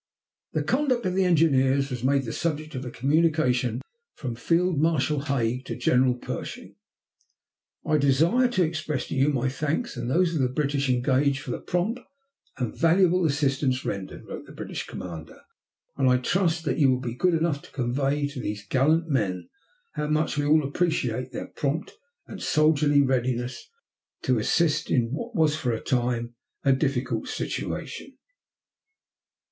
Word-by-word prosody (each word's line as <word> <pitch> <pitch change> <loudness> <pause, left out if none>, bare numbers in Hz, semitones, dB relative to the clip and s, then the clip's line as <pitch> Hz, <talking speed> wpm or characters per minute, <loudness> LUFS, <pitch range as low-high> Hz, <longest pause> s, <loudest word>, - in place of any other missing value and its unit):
The - - 0
conduct 255 -5 +1
of 185 - 0
the 190 0 +2
engineers 140 -5 +3
was 125 -2 -4
made 135 +1 +2
the 115 - -4
subject 155 -2 -2
of 130 -1 -4
a 125 - -5
communication 135 -4 +1 0.3
from 125 -4 -4
Field 170 +6 +1
Marshal 150 -2 +2
Haig 125 -3 0
to - - -4
General 125 +1 +3
Pershing. 125 - -7 1.1
"I 155 - +2
desire 160 - +3
to 205 -7 +1
express 155 -4 -2
to - - -3
you 135 +2 +3
my 130 -3 0
thanks 150 - -2
and 120 -1 -4
those 170 +4 +2
of 155 - 0
the 125 - +2
British 140 0 -1
engaged 135 +2 +2
for 135 - -6
the - - -3
prompt 190 +8 -1 0.6
and 125 -4 -3
valuable 175 +1 +3
assistance 135 -3 0
rendered," 100 -2 -5
wrote - - -8
the - - -12
British - - -6
commander, 80 -3 -8 0.6
"and 135 -2 +3
I 125 - +5
trust 165 +4 0
that - - 0
you 140 -3 +5
will 130 -1 +2
be 125 -3 -4
good 175 +7 +2
enough 160 -3 0
to - - -15
convey 135 +3 0
to 140 -2 -7
these 105 -4 -4
gallant 155 +8 +2
men 95 - -1 0.4
how 150 - -2
much 155 +1 0
we 145 -1 0
all 155 +1 +5
appreciate 130 -5 -1
their 120 - -5
prompt 150 +3 -3 0.3
and - - -9
soldierly 150 -2 +3
readiness 125 - -1 0.5
to 125 -3 +2
assist 150 +6 +1
in 120 -2 +1
what 230 - -5
was 155 -3 +3
for 125 -5 -1
a 115 - -1
time 120 -2 -1 0.3
a 135 - +5
difficult 135 -2 -1
situation." - - -5
140 Hz, 165 wpm, -26 LUFS, 125-160 Hz, 1.1 s, I